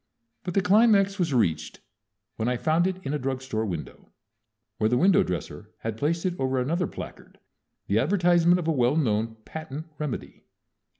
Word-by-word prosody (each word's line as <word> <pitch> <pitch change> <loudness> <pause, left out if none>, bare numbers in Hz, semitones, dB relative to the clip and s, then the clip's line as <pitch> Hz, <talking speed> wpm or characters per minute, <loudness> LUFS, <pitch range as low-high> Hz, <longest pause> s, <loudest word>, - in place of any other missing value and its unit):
But 180 - -5
the 195 - +3
climax 200 -1 +4
was 170 -4 +1
reached 110 - 0 0.6
when 110 - -2
I 125 0 +1
found 160 +6 +2
it 190 -1 -2
in 135 - -2
a 150 - -1
drug 130 0 -2
store 110 -4 -3
window, 85 -5 -7 0.7
where 110 - +2
the 125 - +2
window 185 +7 +5
dresser 90 - -4
had 115 -1 -3
placed 160 +8 -1
it 185 - +1
over 130 0 0
another 165 +7 0
placard, - - -10 0.5
the 105 - +1
advertisement 175 - +3
of 175 -3 -3
a - - +3
well 130 -2 +2
known 115 -6 0
patent 155 -1 -7
remedy. 150 -5 -5
150 Hz, 175 wpm, -26 LUFS, 120-175 Hz, 0.7 s, window